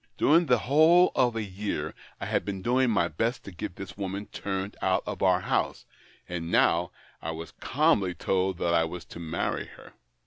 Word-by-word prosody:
During 165 +3 +4
the 125 -1 +5
whole 160 +8 +5
of 125 -2 +2
a 110 - -1
year 100 +1 -4 0.3
I - - -4
had - - 0
been 95 -2 -5
doing 125 +1 +3
my 90 -6 +2
best 115 - -2
to 100 - -9
get 85 0 -6
this 100 - -8
woman 100 +1 -4
turned 95 0 -4
out 95 0 +1
of 100 -3 -5
our 90 -1 +4
house - - -1 0.2
— - - -29
and 85 -2 -4
now 85 0 +3 0.3
I 80 - -4
was 80 +1 -6
calmly 130 - +2
told 95 -1 0
that 85 0 0
I 85 -1 +4
was 85 +1 -5
to - - -10
marry 80 0 -2
her. - - -15
95 Hz, 200 wpm, -28 LUFS, 90-120 Hz, 0.3 s, the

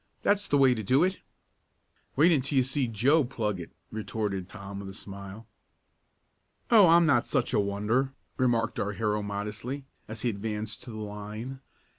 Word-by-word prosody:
"That's 205 -1 +2
the 145 - +3
way 135 -2 +6
to 110 - -3
do 130 - +3
it!" 185 +1 0 1.0
"Wait 160 +6 +5
until 140 -2 +1
you 130 - +5
see 130 0 0
Joe 130 +8 +3
plug 110 -6 -2
it," 85 - -7 0.2
retorted 105 -3 -3
Tom 100 -1 -8
with 100 -1 -7
a 95 - -9
smile. 100 +2 -8 1.3
"Oh, 210 -5 +8
I'm 170 +1 +6
not 135 -7 +3
such - - 0
a - - +3
wonder," 105 +7 0 0.2
remarked 120 -3 +1
our 105 +1 -1
hero 105 0 0
modestly, 105 +7 -4 0.2
as 110 0 -6
he 125 - +2
advanced 105 0 -4
to - - -9
the 110 - -7
line. 105 +5 -6
110 Hz, 170 wpm, -28 LUFS, 105-135 Hz, 1.3 s, Oh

